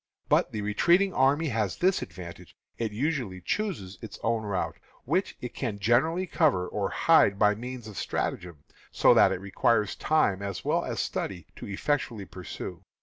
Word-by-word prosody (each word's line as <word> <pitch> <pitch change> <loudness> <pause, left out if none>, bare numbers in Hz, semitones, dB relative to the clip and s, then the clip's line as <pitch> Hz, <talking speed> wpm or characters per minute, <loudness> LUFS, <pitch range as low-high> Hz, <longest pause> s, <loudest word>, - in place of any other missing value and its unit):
But - - +3
the 105 - -3
retreating 175 - +3
army 145 +4 +3
has 110 -6 -1
this 185 +1 +2
advantage; 90 -1 -9 0.2
it 115 -2 -1
usually 120 -5 -2
chooses 100 - -3
its 110 -3 -8
own 115 0 +1
route, 100 -3 -2 0.3
which 175 +9 0
it 125 - -6
can 115 -6 -3
generally 155 - +2
cover 145 - +2
or - - -2
hide 100 - +4
by 105 0 +4
means 120 +1 -7
of 105 - -7
stratagem, 85 -5 -3 0.3
so - - +5
that - - +6
it - - -2
requires 105 +2 +1
time 100 -11 +1
as 100 -3 -5
well - - +1
as - - -4
study 90 -4 -3
to - - -8
effectually 110 0 -2
pursue. 90 -2 -8
110 Hz, 165 wpm, -28 LUFS, 100-145 Hz, 0.3 s, that